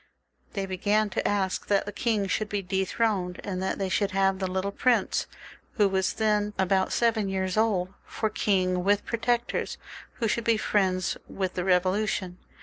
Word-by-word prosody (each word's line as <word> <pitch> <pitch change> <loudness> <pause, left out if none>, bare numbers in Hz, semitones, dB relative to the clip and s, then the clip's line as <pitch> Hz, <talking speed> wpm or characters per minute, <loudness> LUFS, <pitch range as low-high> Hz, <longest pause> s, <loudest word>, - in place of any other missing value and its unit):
They 195 -2 -2
began 205 +3 +1
to - - -1
ask 195 -2 -1
that 200 -1 +2
the 205 - -5
king 210 +1 0
should 210 +3 -1
be 205 -2 -2
dethroned, 190 0 0
and 185 -2 -3
that 190 - -1
they 195 - -1
should 195 +2 +1
have 195 0 +2
the 190 -1 -1
little 190 +2 -1
prince, 245 +3 +1 0.5
who 210 -4 +3
was 190 0 0
then 210 -1 +1
about 190 0 +2
seven 225 -4 +1
years 190 -1 -1
old, 200 -4 +1
for 220 - -2
king, 185 -4 +1
with 205 +1 +2
protectors, 235 +1 -1 0.4
who 230 - -1
should 235 +2 0
be 230 -1 +3
friends 185 -4 +1
of 190 -2 -2
the 180 - -2
Bevolution. 185 0 +1
195 Hz, 170 wpm, -27 LUFS, 190-215 Hz, 0.5 s, who